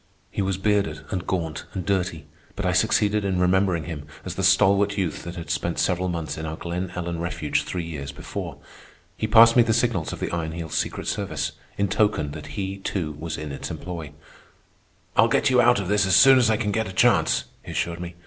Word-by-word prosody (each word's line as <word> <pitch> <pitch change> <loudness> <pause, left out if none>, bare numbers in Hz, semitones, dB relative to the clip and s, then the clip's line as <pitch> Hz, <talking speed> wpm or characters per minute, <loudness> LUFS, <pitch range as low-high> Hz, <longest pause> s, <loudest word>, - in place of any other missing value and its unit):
He - - -2
was 95 -1 -1
bearded 100 -6 0
and 90 -1 -3
gaunt 80 -4 -2
and 90 -2 -3
dirty, 90 -5 -1 0.3
but 100 - -3
I 90 - +2
succeeded 105 +2 +2
in 95 -2 0
remembering 90 -2 +2
him 75 -3 -7 0.2
as - - -4
the - - -4
stalwart 100 +1 +4
youth 90 -5 -1
that 85 +1 -7
had 85 -2 -6
spent 85 - -1
several 90 0 +1
months 85 -3 -4
in 80 - -4
our 80 - -4
Glen 90 +1 -4
Ellen 85 -1 -3
refuge 85 -3 -1
three 90 -2 -3
years 75 -4 -6
before. - - -6 0.6
He 110 - -2
passed 115 +1 +7
me 120 - +7
the 115 -1 +2
signals 115 -9 0
of - - -6
the - - -3
Iron 80 -2 -3
Heel's 85 -1 -6
secret - - -2
service, - - -2 0.3
in 100 - +1
token 100 -7 +1
that 75 0 -8
he, 95 0 -3
too, 90 -5 -3
was 80 0 -4
in 75 -1 -6
its 70 - -6
employ. 85 -5 -6 1.0
"I'll 115 - +6
get 130 +4 +2
you 125 -1 +5
out 120 -1 +4
of 95 - -3
this 100 0 +2
as 95 - +4
soon 135 +2 +8
as 120 -3 +3
I 110 - +3
can 105 -2 -1
get 110 +1 -1
a - - -8
chance," - - +3 0.2
he - - -12
assured 85 0 -2
me. 90 0 -7
90 Hz, 220 wpm, -24 LUFS, 85-100 Hz, 1.0 s, soon